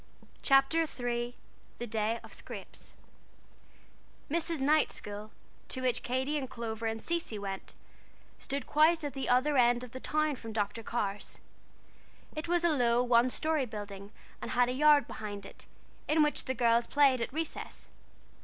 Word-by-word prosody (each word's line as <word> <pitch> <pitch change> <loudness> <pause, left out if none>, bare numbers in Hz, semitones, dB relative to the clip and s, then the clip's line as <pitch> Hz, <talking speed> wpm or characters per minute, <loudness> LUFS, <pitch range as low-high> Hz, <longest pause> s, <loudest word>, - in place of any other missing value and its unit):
CHAPTER 270 +3 +4
III 245 -5 -2 0.4
THE 240 - -4
DAY 220 0 -1
OF - - -12
SCRAPES - - -9 1.4
Mrs. 335 -1 0
Knight's 300 +3 +3
school, 210 +1 -6 0.4
to 260 - -3
which 250 -2 +1
Katy 260 +4 -1
and 265 -2 -5
Clover 225 -1 -4
and 225 0 -3
Cecy 340 -10 -2
went, 195 -1 -6 0.6
stood 275 -1 -3
quite 315 +2 +4
at 290 -3 -3
the 270 -1 -2
other 265 +4 +3
end 245 0 +4
of 250 - -9
the 260 - -7
town 305 0 0
from 225 -2 -8
Dr. 210 +1 -1
Carr's. 210 -3 -3 1.0
It 310 +2 -4
was 345 0 +2
a 345 - +4
low, 245 -5 +3
one 245 0 +4
story 310 -1 +1
building 205 -2 -7 0.3
and - - -5
had 245 0 +3
a - - -1
yard 295 +2 +5
behind 205 -2 -6
it, - - -11 0.4
in 305 +1 +4
which 300 - 0
the 260 - -2
girls 235 -1 +3
played 275 -4 +4
at 235 - -2
recess. 320 +2 -5
250 Hz, 160 wpm, -31 LUFS, 230-295 Hz, 1.4 s, yard